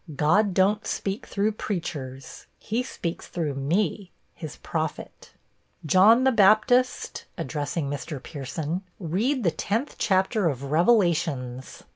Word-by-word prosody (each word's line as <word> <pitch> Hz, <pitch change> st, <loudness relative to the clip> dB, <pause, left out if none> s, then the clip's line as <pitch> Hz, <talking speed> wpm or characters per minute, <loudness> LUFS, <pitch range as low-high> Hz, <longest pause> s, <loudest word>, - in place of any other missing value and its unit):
God 180 Hz, +7 st, +3 dB
don't 205 Hz, +3 st, +2 dB
speak 195 Hz, +1 st, -3 dB
through 205 Hz, +2 st, 0 dB
preachers; 145 Hz, -11 st, -6 dB
he 225 Hz, +3 st, -2 dB
speaks 175 Hz, -9 st, -5 dB
through 160 Hz, -5 st, -2 dB
me, 175 Hz, +7 st, -1 dB, 0.2 s
his 155 Hz, -6 st, -8 dB
prophet. -, -, -5 dB, 0.2 s
' -, -, -44 dB
" -, -, -20 dB
John 220 Hz, +7 st, +7 dB
the 265 Hz, -, +4 dB
Baptist," 225 Hz, +4 st, +3 dB
(addressing 150 Hz, 0 st, -3 dB
Mr. 145 Hz, +2 st, -4 dB
Pierson), 155 Hz, +4 st, -4 dB, 0.2 s
"read 215 Hz, -, 0 dB
the 170 Hz, -, +3 dB
tenth 220 Hz, -, -2 dB
chapter 190 Hz, -1 st, +2 dB
of 135 Hz, -2 st, -4 dB
Revelations." 160 Hz, -, +1 dB
180 Hz, 125 wpm, -25 LUFS, 150-215 Hz, 0.2 s, John